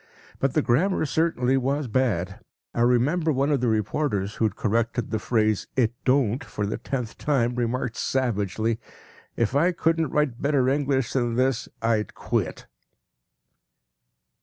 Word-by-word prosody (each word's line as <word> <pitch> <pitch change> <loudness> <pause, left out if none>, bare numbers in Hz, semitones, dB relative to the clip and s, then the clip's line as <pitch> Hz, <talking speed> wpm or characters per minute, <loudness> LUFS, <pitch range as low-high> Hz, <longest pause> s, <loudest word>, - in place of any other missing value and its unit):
But 135 -1 0
the 155 - +3
grammar 160 +9 +2
certainly 135 -4 +1
was 135 +2 0
bad. 105 -7 0 0.3
I 115 - -1
remember 140 +8 +3
one 140 +1 +1
of 140 -4 +1
the 125 - +1
reporters 105 -1 0
who 110 - 0
had 110 - -1
corrected 115 +2 -1
the 110 - 0
phrase 110 -2 +1
“it 120 -3 +2
don’t” 130 -2 +2
for 105 - -4
the 105 - -3
tenth 125 -5 -4
time 125 -5 +1
remarked 120 0 -2
savagely, 110 -3 -1 0.6
“If 115 +3 0
I 170 +6 +4
couldn’t 165 -2 +1
write 145 -5 0
better 140 -3 +2
English 135 -2 +1
than 120 -3 0
this, 130 0 0
I’d 110 -2 0
quit. - - -2
125 Hz, 145 wpm, -25 LUFS, 115-140 Hz, 0.6 s, I